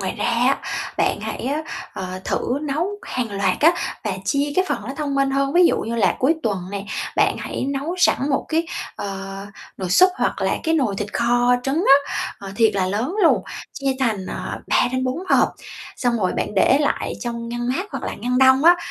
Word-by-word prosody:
Ngoài 190 -1 -3
ra - - -1
á, 245 +4 +2 0.4
bạn - - +1
hãy - - -5
á, 290 +4 -1 0.3
ờ, 185 0 -5
thử 255 - -1
nấu 305 +3 -1 0.2
hàng 245 -3 -3
loạt 195 -2 0
á 325 +3 +6 0.3
và 210 - -1
chia 285 +4 0
cái 370 - +4
phần - - 0
nó 260 +6 -6
thông 290 -2 -2
minh 275 0 +2
hơn, 275 0 0
ví 355 +1 +6
dụ - - +2
như 230 +2 -3
là 195 -6 +2
cuối 275 +5 +3
tuần 205 -4 0
nè, 200 -1 -4 0.3
bạn - - +3
hãy - - -4
nấu 280 +5 -2
sẵn 290 -5 +3
một 275 - 0
cái, 325 +1 0 0.3
ờ, 195 -1 -5 0.4
nồi 185 -2 -4
súp 365 - +6
hoặc - - -1
là - - +1
cái 325 -1 +1
nồi 260 -10 +1
thịt 210 0 -4
kho 245 +1 +3
trứng 280 +7 0
á, 280 +1 +5 0.2
ờ, 195 -1 -8
thiệt 225 -3 +3
là 190 -2 +1
lớn 220 - -2
luôn, 335 - +4 0.3
chia 275 -1 -1
thành, 215 -7 0
à, - - -5
3 - - +3
đến 255 0 0
4 255 +4 -1
hộp, - - +4 0.5
xong 245 -3 0
rồi 185 -3 0
bạn 210 - -3
để 260 +7 +4
lại 290 - 0
trong 235 -1 -4
ngăn 240 0 -3
mát 345 +11 -1
hoặc - - -4
là - - -3
ngăn 250 +1 -1
đông 265 +2 +5
á, 350 +1 +8
255 Hz, 220 wpm, -21 LUFS, 210-280 Hz, 0.5 s, á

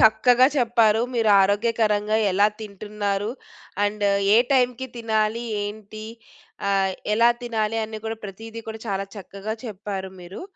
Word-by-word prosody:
చక్కగా 245 +4 +6
చెప్పారు. 230 -3 +3
మీరు 225 -2 +3
ఆరోగ్యకరంగా 210 +1 +1 0.2
ఎలా 200 +2 +5
తింటున్నారు? 205 0 -3 0.5
అండ్ 205 0 -1 0.3
ఏ - - +7 0.2
టైమ్‌కి 250 0 +2
తినాలి? 220 0 0 0.2
ఏంటి? 215 +1 -7 0.6
ఆహ్, 195 -1 +2 0.2
ఎలా 230 +2 +5
తినాలి? 225 -2 -1
అని 220 0 -7
కూడా 225 0 -3
ప్రతీది 225 +3 -8
కూడా 220 0 -6
చాలా 195 0 -2
చక్కగా 200 +2 -6
చెప్పారు 195 -2 -5
మీరు. 175 +2 -9
215 Hz, 125 wpm, -24 LUFS, 205-225 Hz, 0.6 s, ఏ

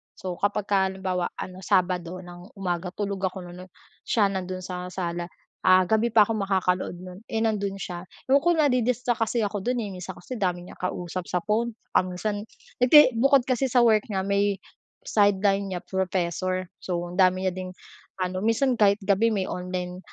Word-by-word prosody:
So, 180 -2 -6
kapag 205 0 0
ka 200 - +4
halimbawa 190 -2 -2
ano, 185 0 -7
Sabado 185 -1 0
ng 175 +3 -12
umaga 180 -2 -2
tulog 200 -2 -3
ako 185 0 -7
nun 180 +1 -10 0.4
siya 205 -4 +3
nandoon 185 -1 -4
sa 180 0 -5
sala, 175 -2 -3 0.4
ah, 185 0 +7
gabi 220 +5 +2
pa 220 -2 +6
ako 220 +1 -2
makakanood 185 -2 0
no'n, 185 0 -9
eh, 225 -3 -2
nandoon 200 -3 0
siya 180 -1 -6 0.2
ayoko 305 +6 +4
nadi-distract 250 -5 +1
kasi 230 +1 0
ako 205 0 -2
do'n, 245 +6 -1
eh, 205 - -5
minsan 185 0 -7
kasi 245 +6 -7
dami 180 -2 -1
niyang - - -13
kausap 180 0 -4
sa 180 -1 -1
phone, 225 +3 0 0.2
um, - - +3
minsan 205 +2 -3 0.3
hindi 255 +2 +8
bukod 275 +1 +5
kasi 255 +1 0
sa 245 -1 +4
work 215 -2 +4
niya 195 -4 -2
may 200 +1 +1 0.5
sideline 200 -1 +2
niya 180 -2 -4
professor. 185 0 -1 0.2
So, 180 -2 -2
ang 180 - -7
dami 185 0 +4
niya 185 - +1
ding 185 0 -6 0.5
ano 185 0 -2
minsan 230 +5 +2
kahit 200 -1 +5
gabi 200 +3 +3
may 190 -2 0
online, 180 0 -4
190 Hz, 180 wpm, -26 LUFS, 180-215 Hz, 0.5 s, hindi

